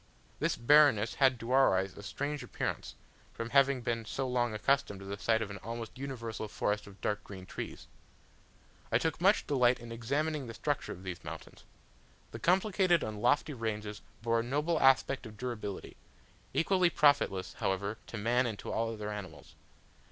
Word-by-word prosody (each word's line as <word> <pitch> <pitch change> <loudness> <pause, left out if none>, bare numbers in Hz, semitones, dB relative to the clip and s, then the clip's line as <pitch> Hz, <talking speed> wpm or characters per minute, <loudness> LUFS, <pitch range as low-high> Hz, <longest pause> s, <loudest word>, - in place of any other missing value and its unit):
This - - +1
barrenness 130 -4 +5
had 130 -2 +5
to 115 +2 -5
our 135 -7 +5
eyes 95 0 -2
a - - -9
strange 145 +7 -3
appearance, - - -4 0.4
from 115 0 -5
having 140 -2 +4
been 115 -1 -1
so 130 +4 -3
long 120 -2 +1
accustomed 120 -1 +1
to - - -9
the 100 +1 -4
sight 110 +1 +2
of 105 - -7
an 100 - -7
almost 115 0 -6
universal 120 -5 -5
forest 105 0 -1
of 100 -1 -13
dark 105 0 -1
green 95 -2 -9
trees. - - -7 1.1
I - - +5
took 160 0 -1
much 200 +4 +4
delight 125 -3 +3
in 120 0 -9
examining 140 +5 -1
the 115 - -7
structure 145 -2 -2
of 90 - -8
these 90 -2 -6
mountains. - - -9 0.7
The - - -7
complicated 185 -2 +3
and 105 -1 -5
lofty 145 +5 +2
ranges 105 -3 -4 0.2
bore 115 0 +2
a - - 0
noble 150 +6 0
aspect 135 -1 +3
of 105 -1 -12
durability 110 -5 -5 0.6
equally 185 0 +3
profitless, 145 - +3
however, 100 +3 -1
to 115 - -6
man 120 +4 +2
and 110 -3 -4
to - - -6
all 115 0 0
other 105 -1 -5
animals. 90 -9 -8
115 Hz, 175 wpm, -32 LUFS, 105-140 Hz, 1.1 s, barrenness